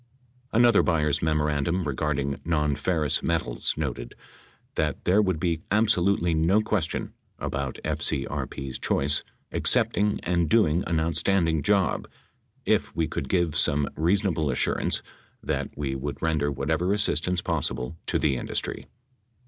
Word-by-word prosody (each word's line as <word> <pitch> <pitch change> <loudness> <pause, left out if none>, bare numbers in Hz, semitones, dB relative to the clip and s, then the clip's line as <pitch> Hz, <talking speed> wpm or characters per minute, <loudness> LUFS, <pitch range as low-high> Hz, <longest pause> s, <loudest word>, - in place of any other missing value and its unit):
Another 120 -1 +5
Byers 75 -4 +1
memorandum 75 +2 0
regarding 70 0 -1
nonferrous 75 0 0
metals 80 -8 -1
noted - - -4 0.6
that - - -2
"there 95 +4 +4
would 95 -6 0
be 85 -2 -1
absolutely 100 -5 +2
no 80 +6 +3
question" 105 -7 -2 0.2
about 70 -1 -3
FCRP's 70 -1 -2
choice 70 +2 +1 0.3
"accepting 105 0 +2
and 85 -2 +1
doing 90 -6 +3
an 80 -1 +1
outstanding 85 0 +1
job... 95 +3 +1 0.6
if - - +1
we 80 -1 +1
could - - -4
give 85 -4 +1
some 70 0 +3
reasonable 85 -2 +1
assurance 65 - 0 0.4
that - - -2
we 70 -2 -2
would 70 +2 -4
render 75 -3 0
whatever 80 +7 0
assistance 90 -3 +1
possible 65 -3 -2
to - - +2
the 70 -3 +1
industry." - - -4
80 Hz, 125 wpm, -26 LUFS, 70-90 Hz, 0.6 s, Another